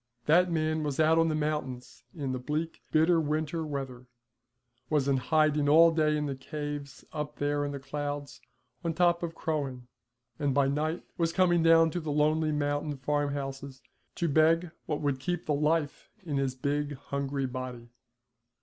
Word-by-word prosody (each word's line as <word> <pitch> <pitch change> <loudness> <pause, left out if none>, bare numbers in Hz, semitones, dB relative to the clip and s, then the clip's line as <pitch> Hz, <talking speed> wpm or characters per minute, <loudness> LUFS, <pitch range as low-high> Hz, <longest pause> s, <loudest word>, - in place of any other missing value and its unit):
That 175 +3 +4
man 155 -1 0
was 145 -2 -3
out 160 +1 +5
on 165 - +4
the 155 - 0
mountains 150 -5 -3
in 140 -5 -3
the 130 - -2
bleak, 155 +5 -3
bitter 160 +2 +4
winter 155 +2 -1
weather, 135 -4 -5 0.8
was 145 -3 +1
in 140 -1 +3
hiding 150 +2 +2
all 165 +3 +7
day 155 -2 +2
in 150 - -1
the 140 - -2
caves 145 0 -6
up 150 -1 -4
there 145 0 0
in 145 - -2
the 140 - -4
clouds 145 0 -5 0.4
on 165 -2 -1
top 175 0 +3
of 165 -1 -4
Croghan, 140 -7 -3 0.5
and 140 -3 0
by 140 -1 +4
night 155 +4 -1 0.2
was 165 -1 +2
coming 175 -1 +3
down 165 0 +5
to 175 - -2
the 155 -3 -4
lonely 155 +1 +2
mountain 145 0 -1
farmhouses 140 -1 -3 0.3
to 170 - 0
beg 160 +3 +3 0.2
what 150 - -2
would 140 -3 0
keep 175 +5 -3
the 150 - 0
life 150 0 0 0.2
in 145 -4 -2
his 135 -2 0
big 145 +2 -1
hungry 140 0 -3
body. 125 -2 -6
150 Hz, 170 wpm, -29 LUFS, 140-160 Hz, 0.8 s, all